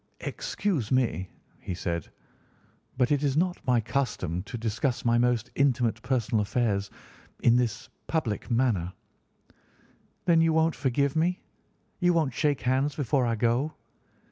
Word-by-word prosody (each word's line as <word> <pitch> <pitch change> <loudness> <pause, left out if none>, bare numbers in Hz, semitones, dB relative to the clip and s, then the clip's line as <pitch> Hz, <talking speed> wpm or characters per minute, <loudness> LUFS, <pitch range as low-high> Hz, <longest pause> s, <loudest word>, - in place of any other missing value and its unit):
"Excuse 195 - -2
me," 110 -9 +1 0.3
he 95 -3 -5
said, 85 -3 -3 0.9
"but 125 0 +2
it 145 -1 +2
is 140 -1 +1
not 180 +2 +1
my 125 -2 +4
custom 110 - -2
to 120 +5 -7
discuss 115 +3 -1
my 120 0 +4
most 125 0 +1
intimate 125 -4 +1
personal 120 -3 0
affairs 105 -2 0 0.5
in 120 - +6
this 120 0 -1 0.2
public 125 -12 -2
manner." 115 -8 +1 1.3
"Then 170 -3 +5
you 165 0 +3
won't 160 0 +3
forgive 140 +1 0
me? 175 +3 +1 0.6
You 175 -1 +3
won't 155 -6 +1
shake 145 +1 +1
hands 135 +3 +1
before 135 -2 +1
I 115 - +1
go?" 120 +7 0
125 Hz, 140 wpm, -27 LUFS, 115-145 Hz, 1.3 s, in